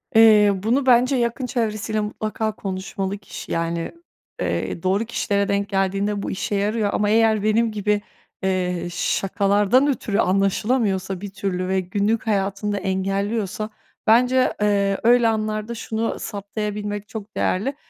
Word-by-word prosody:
Eee, 215 -2 +7
bunu 250 +5 +2
bence 255 +1 +4
yakın 240 +1 -1
çevresiyle 220 -2 -1
mutlaka 215 +1 -3
konuşmalı 195 0 -4
kişi. 200 - -9
Yani, 165 0 -2 0.5
eee, 165 - -2
doğru 195 +4 +1
kişilere 200 -3 0
denk 200 0 0
geldiğinde 195 +1 0
bu - - -3
işe 195 +2 -2
yarıyor 205 +1 0
ama 205 -1 +1
eğer 220 -1 +3
benim 220 +2 +2
gibi, 210 0 0 0.4
eee, 180 -2 -1
şakalardan 200 +7 +2
ötürü 225 -7 -1
anlaşılamıyorsa 195 -1 +1
bir 205 - -5
türlü 190 -2 -3
ve 190 0 +1
günlük 205 +5 -1
hayatını 200 0 0
da 205 - -1
engelliyorsa, 195 +2 -2 0.4
bence, 250 +3 +4
eee, 200 -1 +2
öyle 240 0 +5
anlarda 215 +1 -1
şunu 225 0 -3
saptayabilmek 205 0 -4
çok 215 -2 -8
değerli, 240 +10 0
205 Hz, 135 wpm, -22 LUFS, 195-220 Hz, 0.5 s, Eee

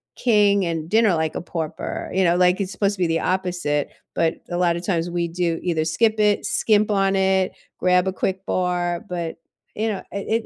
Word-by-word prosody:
king 205 -4 +3
and 165 -1 -3
dinner 220 -1 +4
like 160 -1 -1
a - - -3
pauper." 165 -2 -5
You 190 - +2
know, 175 -1 +3
like, 180 +1 +3
it's 195 0 -3
supposed 200 +1 0
to 185 - -19
be 180 - +2
the 165 0 +1
opposite, 175 -6 -1 0.3
but 165 0 +1
a 175 - -2
lotta 170 -1 +1
times 175 -2 -1
we 170 0 -1
do 170 -1 -1
either 160 -3 0
skip 215 +6 +1
it, 210 -1 +3
skimp 215 -1 +2
on 195 -1 +2
it, 190 -1 +2 0.3
grab 180 0 +3
a - - +1
quick 190 0 -2
bar, 180 0 -1
but, 170 -2 -3 0.4
you 220 +1 -1
know, 205 - -3
it 220 +3 -1
180 Hz, 200 wpm, -22 LUFS, 170-200 Hz, 0.4 s, dinner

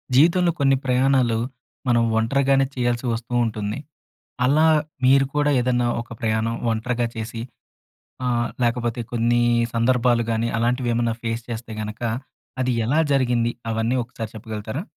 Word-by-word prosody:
జీవితంలో 170 +4 +5
కొన్ని 135 -1 +4
ప్రయాణాలు, 130 -2 +3 0.5
మనం 120 -1 +3
ఒంటరిగానే 135 +4 +3
చేయాల్సొస్తూ 120 -1 -1
ఉంటుంది. 105 +1 -3 0.7
అలా 155 +5 +4 0.4
మీరు 135 +1 +5
కూడా 145 0 +2
ఏదైనా 125 -1 +1
ఒక 115 - -13
ప్రయాణం 110 +1 0 0.2
ఒంటరిగా 120 +2 -1
చేసి, 115 0 -5 0.9
ఆహ్, 120 -1 +1 0.2
లేకపోతే 120 0 0
కొన్ని 120 0 +2 0.3
సందర్భాలు 120 0 +2
గాని, 115 +1 0
అలాంటివి 120 +1 0
ఏమన్నా 115 -1 0
ఫేస్ 115 +1 -2
చేస్తే 115 -1 -5
గనక, 105 +2 -7 0.6
అది 125 0 +1
ఎలా 145 +7 +3
జరిగింది, 120 -3 +1 0.2
అవన్నీ 115 +3 0
ఒకసారి 115 -2 -7
చెప్పగలుగుతారా? 110 +5 -5
120 Hz, 125 wpm, -23 LUFS, 115-130 Hz, 0.9 s, జీవితంలో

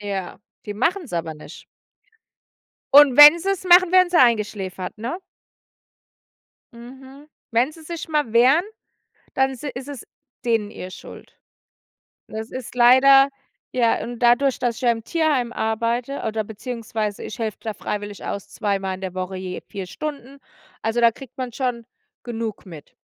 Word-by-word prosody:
Ja, 200 -2 -5 0.3
die 205 - -5
machen's 330 - -1
aber 165 -2 -3
nicht. 150 - -13 1.3
Und 290 -3 +8
wenn 300 +3 +10
sie's 390 +1 -2
machen, 360 0 +6
werden 365 -1 +5
sie 345 - +4
eingeschläfert, 210 -5 0
ne? 245 +10 -4 1.6
Mhm. 265 +4 -13 0.2
Wenn 245 +6 +2
sie 320 0 -15
sich 335 0 -7
mal 295 -7 -1
wehren, 260 +9 +5 0.7
dann 265 0 +1
si 285 +4 -6
ist 260 +2 -8
es 280 -4 -8 0.4
denen 225 -4 0
ihr 185 -3 -9
Schuld. - - -13 0.9
Das 220 +1 -7
ist 255 -1 -8
leider 270 +3 +6 0.4
ja, 235 -2 +1
und 240 0 -7
dadurch, 245 +3 +3
dass 240 -2 -1
ich - - -9
ja 245 - +4
im 225 -1 -3
Tierheim 295 -7 0
arbeite 230 +4 -2
oder 220 0 -1
beziehungsweise 220 -1 -5
ich 215 - -7
helfe 220 -3 -3
da 220 - -4
freiwillig 205 0 -6
aus 200 - -5
zweimal 195 -3 -2
in 190 - -14
der 185 -1 -6
Woche 185 0 -4
je 185 -1 -6
4 195 -2 -6
Stunden. 280 - -7 0.4
Also, 225 +2 0
da 235 -1 +5
kriegt 265 +1 -14
man 250 -2 -4
schon 240 -3 -3 0.4
genug 225 -4 -5
mit. 160 -5 -12
235 Hz, 155 wpm, -22 LUFS, 210-275 Hz, 1.6 s, wenn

